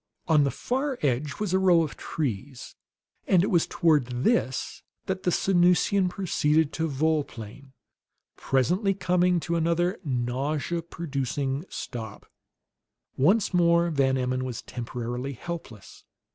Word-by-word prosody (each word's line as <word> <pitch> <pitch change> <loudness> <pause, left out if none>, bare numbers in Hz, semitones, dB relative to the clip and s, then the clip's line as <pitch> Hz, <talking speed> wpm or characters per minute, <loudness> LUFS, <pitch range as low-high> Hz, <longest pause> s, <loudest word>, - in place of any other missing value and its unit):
On 155 -3 +5
the - - +1
far 265 - -2
edge 140 +1 0
was 205 -4 -2
a 190 - +4
row 180 -3 +5
of 155 - -5
trees, 130 -3 -5 0.5
and 180 -2 +4
it - - 0
was 170 -3 +3
toward 155 -7 +2
this 130 - -1 0.2
that 190 -1 -2
the 180 - +1
Sanusian 180 +1 +3
proceeded 160 -5 +1
to 165 -1 -1
volplane, 140 -4 -2 0.6
presently 180 - +1
coming 180 -1 +2
to 170 +1 -2
another 170 +2 +1
nausea 140 +5 -2
producing 140 -3 -3
stop. 110 -4 -7 0.9
Once 190 +10 +3
more 170 -1 +3
Van 135 -3 +2
Emmon 130 0 -1
was 125 -3 -5
temporarily 120 +2 -5
helpless. 130 - -8
155 Hz, 125 wpm, -26 LUFS, 130-175 Hz, 0.9 s, On